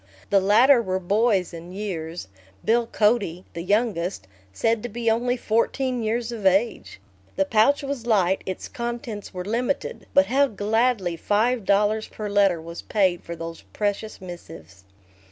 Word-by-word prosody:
The 200 - +6
latter 235 +7 +5
were 185 -4 -1
boys 200 0 +1
in 170 +2 -9
years 175 - -5 0.4
Bill 230 +1 +2
Cody, 210 -6 +1
the 170 - -5
youngest, 200 - 0 0.3
said 225 - 0
to 240 - -5
be 235 -1 0
only 245 +2 0
fourteen 245 +3 0
years 230 +2 -1
of 225 -3 -6
age. 195 - +1 0.4
The 195 - +2
pouch 225 +9 +3
was 275 -4 -4
light, 195 -4 +2
its 185 - -4
contents 235 -3 -5
were 180 -1 -6
limited 240 +6 -2
but 280 0 +6
how 280 +2 +3
gladly 215 -4 0
five 220 +5 +1
dollars 210 +2 +2
per 210 -1 -6
letter 200 -4 +3
was 170 +1 -8
paid 190 -5 +1
for 170 - -7
those 165 0 -7
precious 210 +1 -2
missives. 100 - -11
210 Hz, 155 wpm, -24 LUFS, 185-235 Hz, 0.4 s, The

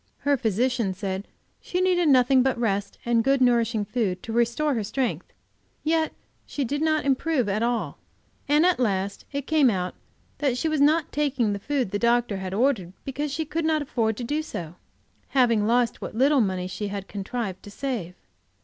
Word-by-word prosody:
Her 285 0 +3
physician 230 -3 0
said 190 0 -4 0.3
she 360 - -3
needed 360 -3 +3
nothing 260 0 +5
but 260 -1 +1
rest 205 -4 -1
and 235 -1 +2
good, 275 +2 +3
nourishing 235 -4 +2
food 200 -5 -2
to 225 - -5
restore 240 +6 +1
her 225 -4 -1
strength, 245 +4 -2 0.5
yet 320 0 +1 0.3
she 285 - -3
did 290 +5 -2
not 310 -2 +1
improve 275 -2 +1
at 205 +2 0
all, 235 0 -1 0.5
and 295 +3 +4
at 365 -5 +3
last 200 -4 -1
it 280 -1 -3
came 305 -4 +4
out 185 -4 -2 0.5
that 270 -4 +1
she 320 - 0
was 310 -2 0
not 310 +2 +3
taking 265 -7 0
the 200 - -4
food 260 -2 -1
the 205 - -1
doctor 235 -4 +1
ordered, 220 -7 +1
because 285 +2 -3
she 315 +3 -2
could 320 +2 -2
not 310 -1 +1
afford 225 -5 -1
to 245 - -4
do 295 +6 -1
so, 170 - -6 0.5
having 235 -6 +3
lost 240 0 +1
what - - -6
little 275 +3 +4
money 185 -3 -1
she 190 +3 -4
had 200 -1 -5
contrived 200 -1 -4
to - - -11
save. 205 -6 -4
245 Hz, 185 wpm, -25 LUFS, 205-285 Hz, 0.5 s, nothing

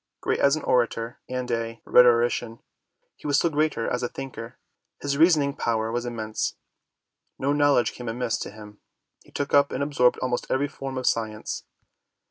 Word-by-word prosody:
Great - - -1
as 140 +1 +4
an 155 - -5
orator 115 -1 0
and 125 -1 -3
a 115 0 -2
rhetorician, 120 -1 +4 0.6
he - - -9
was 145 -1 +3
still 170 +2 +2
greater 150 -5 0
as 125 - -1
a 120 - -2
thinker. 130 -3 -8 0.4
His 140 -1 -1
reasoning 150 -3 +4
power 110 -1 -1
was 120 +1 -2
immense. 110 -3 -3 0.8
No 140 +2 0
knowledge 145 -4 +3
came 120 -2 -6
amiss 115 -2 -2
to - - -5
him. 105 0 -13 0.4
He - - -21
took 140 -1 -3
up 140 0 +5
and - - -1
absorbed 135 -4 +3
almost 125 -1 -2
every 140 +2 +1
form 135 -1 -6
of 130 - -3
science. 110 -1 -2
125 Hz, 170 wpm, -25 LUFS, 115-140 Hz, 0.8 s, up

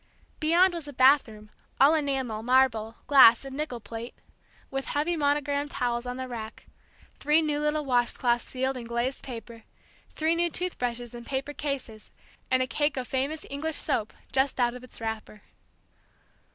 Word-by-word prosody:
Beyond 345 +4 +4
was 335 -4 -6
a 290 - -8
bathroom, 245 -5 +3 0.3
all 280 +4 +7
enamel, 270 -8 -1
marble, 230 -2 +2
glass, 260 -3 +7
and 270 0 -7
nickel 285 -5 -4
plate, 230 +3 -8 0.6
with 270 0 -3
heavy 310 +4 0
monogrammed 290 -1 0
towels 240 -2 -2
on 250 0 -4
the 260 0 -4
rack, 225 -3 -8 0.5
three 300 +2 +4
new 295 -1 0
little 300 0 0
wash 245 -2 +2
cloths 240 -1 +1
sealed 260 +1 -2
in 240 - -7
glazed 235 +3 -2
paper, 230 -3 -8 0.5
three 320 +1 +2
new 345 +1 +1
tooth 360 +2 -3
brushes 240 -1 -3
in 240 0 -8
paper 270 +3 -3
cases, 270 -7 -5 0.4
and 255 0 +3
a - - -1
cake 290 +4 0
of 255 -2 -3
famous 280 +4 -2
English 300 +3 -3
soap 225 -8 0 0.2
just 265 0 +1
out 240 -1 +2
of 250 0 -10
its 255 - -11
wrapper. 220 -2 -6
260 Hz, 165 wpm, -27 LUFS, 235-290 Hz, 0.6 s, all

